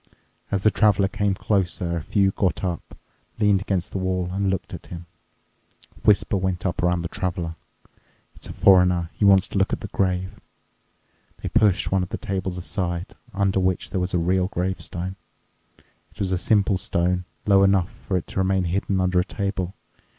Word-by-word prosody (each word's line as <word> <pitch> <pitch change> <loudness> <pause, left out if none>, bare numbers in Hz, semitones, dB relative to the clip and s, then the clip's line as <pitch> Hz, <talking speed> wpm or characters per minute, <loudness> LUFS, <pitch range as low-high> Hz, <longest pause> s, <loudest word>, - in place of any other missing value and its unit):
As 100 -2 0
the 110 - +4
Traveler 100 -3 +3
came 100 0 0
closer, 90 -4 -1
a 85 - -2
few 95 +5 +2
got 95 -4 -1
up, 90 -3 -4 0.4
leaned 105 -3 +3
against 95 -4 -2
the 95 - -3
wall, 90 -1 -1
and 100 +1 0
looked 95 -1 -3
at - - -8
him. 85 -1 -8 0.9
A - - -18
whisper 105 0 +3
went 95 -1 -2
up 90 - -1
around 90 -1 +1
the - - -2
Traveler—"It's 90 -2 -8
a - - -6
foreigner. 90 -3 +4
He 105 - 0
wants 95 -1 +5
to 100 - -1
look 95 - +1
at - - -2
the - - -5
grave." 95 -1 -1 1.0
They - - -2
pushed 105 -5 +3
one 95 -1 +2
of 90 - -4
the - - -4
tables 95 -4 -3
aside, 85 -1 -2 0.2
under 95 0 +1
which 95 -1 -1
there 95 - -1
was 90 0 -1
a - - +3
real 90 +2 +1
grave 95 0 -2
stone. 90 +2 -5 0.9
It - - -26
was 95 -2 -1
a 95 - +2
simple 100 0 +2
stone, 90 +1 0 0.2
low 100 -1 +5
enough 95 -2 +3
for 95 - -3
it 90 - -4
to - - -3
remain 95 0 +2
hidden 95 +2 -1
under 90 -1 +2
a - - +3
table. 95 -2 -3
95 Hz, 185 wpm, -23 LUFS, 90-100 Hz, 1.0 s, wants